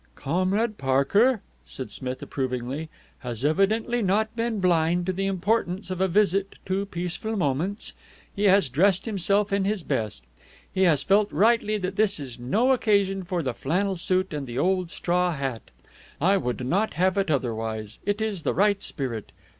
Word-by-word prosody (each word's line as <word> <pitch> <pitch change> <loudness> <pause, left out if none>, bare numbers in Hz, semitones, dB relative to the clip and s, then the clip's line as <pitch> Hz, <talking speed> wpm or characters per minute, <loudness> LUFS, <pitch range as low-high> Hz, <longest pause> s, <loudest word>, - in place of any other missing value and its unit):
"Comrade 185 +9 0
Parker," 190 - +3 0.2
said 130 - -7
Smith 130 -1 -4
approvingly, 130 +3 -3 0.3
"has 120 +1 -4
evidently 215 +9 +2
not 215 +3 +1
been 230 -2 -1
blind 175 -1 +2
to 185 - -1
the 195 +1 -1
importance 195 0 -1
of 185 0 -3
a 190 - +4
visit 195 +1 +1
to 195 +1 -1
Peaceful 180 +5 -3
Moments. 170 +5 -1 0.4
He 205 0 0
has 195 -4 +5
dressed 180 +8 +2
himself 200 -1 +1
in 200 -1 +2
his 200 -2 -1
best. 110 - -2 0.5
He 190 0 +3
has 150 -6 +3
felt, 205 +3 +3
rightly, 215 0 +3
that 185 -1 -4
this 210 -4 +3
is 130 -4 -8
no 215 - +2
occasion 200 -6 +2
for 175 -2 -2
the 130 -3 -2
flannel 185 +10 -1
suit 185 +1 0
and 145 -2 -4
the 120 0 -6
old 185 +3 +1
straw 180 +1 0
hat. 135 -6 -4 0.5
I 190 +6 +4
would 125 -7 -2
not 195 +11 0
have 185 +2 +2
it 195 -3 0
otherwise. 110 -5 -2
It 205 +2 -1
is 215 -5 -2
the - - -1
right 200 +1 +3
spirit. 125 - -4
185 Hz, 170 wpm, -25 LUFS, 140-200 Hz, 0.5 s, has